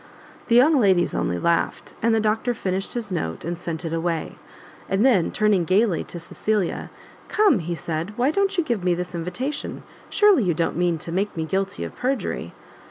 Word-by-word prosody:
The 235 - +3
young 280 +4 +6
ladies 190 -6 +3
only 90 - -1
laughed, 170 - 0
and 230 0 +3
the - - +3
doctor 220 +3 0
finished 190 +1 -3
his 225 -4 -4
note, 80 - -3
and 170 +1 -2
sent 170 0 -5
it 165 - -3
away; 165 -1 -2 0.5
and 195 +5 +2
then, 210 -11 +4
turning 210 -4 +2
gaily 185 +2 +2
to - - -8
Cecilia, 200 +3 -2 0.4
"Come," 415 - +3
he 170 0 -3
said, 165 +4 -4
"why 255 +4 +3
don't 395 +3 +1
you 345 - +3
give 235 -10 -2
me 180 -1 +2
this 180 +1 -5
invitation? 180 - -4 0.3
surely 415 - +5
you 175 -4 +1
don't 165 +1 0
mean 175 -1 +1
to 165 - -6
make 195 +2 -1
me 160 - -1
guilty 195 +4 -2
of - - -7
perjury?" 265 +2 -2
190 Hz, 190 wpm, -23 LUFS, 170-235 Hz, 0.5 s, young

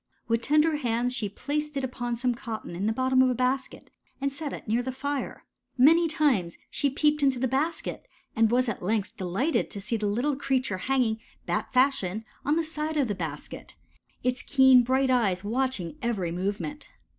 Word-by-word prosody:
With 230 0 +1
tender 305 +4 +3
hands 245 -2 0
she 220 -4 -2
placed 295 +7 -3
it 275 - -1
upon 245 -2 -3
some 245 +1 0
cotton 225 -6 -6
in 195 +4 -1
the - - +2
bottom 260 +2 +3
of 260 - +4
a 250 - 0
basket 255 +2 -2 0.3
and 275 0 -1
set 290 0 -4
it - - -8
near 230 +3 +2
the 260 +1 -3
fire. 280 +2 -4 0.3
Many 325 +6 +6
times 260 - +1
she 285 - +1
peeped 300 +2 +1
into 270 -2 +3
the 260 +2 0
basket 285 +6 -2 0.3
and 225 -1 +4
was 250 +2 +2
at 225 - -3
length 205 +2 -1
delighted 195 - 0
to 200 - -5
see 225 +4 -1
the 210 -1 -1
little 245 +8 0
creature 260 -8 -1
hanging 245 -2 +1 0.3
bat - - -2
fashion 225 -6 +1 0.2
on 295 - +2
the 330 - +1
side 310 0 -3
of 270 -6 +1
the - - +1
basket, 195 - -7 0.5
its 250 0 0
keen, 265 -2 +6
bright 260 +2 +2
eyes 205 -7 +2
watching 235 - -1
every 210 -8 -1
movement. 200 - -4
255 Hz, 190 wpm, -27 LUFS, 220-280 Hz, 0.5 s, Many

